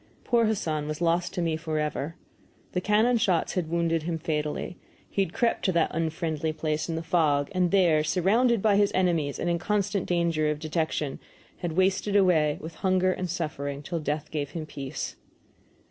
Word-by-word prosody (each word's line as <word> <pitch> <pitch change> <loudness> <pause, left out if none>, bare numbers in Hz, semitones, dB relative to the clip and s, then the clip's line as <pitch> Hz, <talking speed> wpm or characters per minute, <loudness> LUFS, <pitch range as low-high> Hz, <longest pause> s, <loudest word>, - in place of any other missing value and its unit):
Poor 235 -2 +3
Hassan 160 -9 -1
was 155 0 -4
lost 175 +1 +1
to 175 - 0
me 165 -1 0
forever. 155 -1 -2 0.6
The 180 - -1
cannonshots 210 -3 +2
had 175 -4 -2
wounded 165 -1 +1
him 165 +1 -2
fatally, 150 +1 -3 0.3
he 200 - -1
had 165 - -6
crept 235 +5 0
to 190 - +3
that 170 -1 +2
unfriendly 160 -1 -1
place 155 0 -2
in 165 - -1
the 165 - -3
fog, 155 -4 +2
and 180 -2 +2
there, 170 -5 +4
surrounded 210 +7 +2
by 210 -2 +4
his 205 -1 +3
enemies 170 -6 +1
and - - -2
in 170 0 +1
constant 205 0 0
danger 170 -3 +1
of 150 - -1
detection, 155 -2 -2 0.4
he - - -28
had 175 -3 -2
wasted 190 +3 +1
away 165 -7 +4
with 160 +1 -8
hunger 185 -1 +3
and 180 -1 -4
suffering 145 -4 -3
till 170 +2 -3
death 150 0 -3
gave 145 -3 -2
him 155 +1 -5
peace. 140 -3 -6
165 Hz, 180 wpm, -27 LUFS, 155-185 Hz, 0.6 s, there